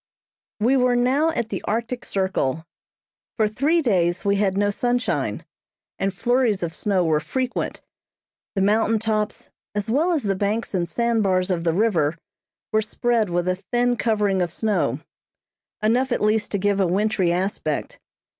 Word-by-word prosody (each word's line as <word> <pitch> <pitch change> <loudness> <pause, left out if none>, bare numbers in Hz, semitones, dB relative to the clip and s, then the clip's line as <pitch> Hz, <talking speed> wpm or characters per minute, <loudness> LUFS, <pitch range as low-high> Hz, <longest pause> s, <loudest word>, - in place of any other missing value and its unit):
We 240 +6 +3
were 250 -1 +3
now 260 +6 +2
at 235 -9 -2
the - - -3
Arctic 235 +3 -2
Circle. 170 -6 -1 0.7
For 215 -2 +3
three 295 +10 +1
days 180 -7 +1
we 200 0 +2
had 195 -1 +1
no 205 0 +2
sunshine, 245 +3 -1 0.5
and 195 - 0
flurries 235 0 +1
of 165 -1 -3
snow 190 -2 0
were 155 -2 +2
frequent. 255 +8 -3 0.7
The 195 - +1
mountain 220 +2 +3
tops, 215 -1 -2 0.2
as 210 +1 -2
well 315 +8 +2
as 310 - 0
the 200 -2 +1
banks 205 +4 -2
and 175 -2 -1
sand 235 +3 +1
bars 185 -1 +1
of 170 -2 -1
the 165 - +2
river, 170 -8 +2 0.5
were 215 - +3
spread 225 0 0
with 175 +1 -1
a 185 0 +1
thin 245 0 +2
covering 210 -5 +1
of 175 -2 -1
snow; 215 +3 0 0.8
enough 245 +4 +2
at - - +1
least 215 +1 +1
to - - +2
give 200 +1 +1
a 190 - +3
wintry 190 -1 +1
aspect. 175 -4 -2
210 Hz, 165 wpm, -23 LUFS, 185-235 Hz, 0.8 s, We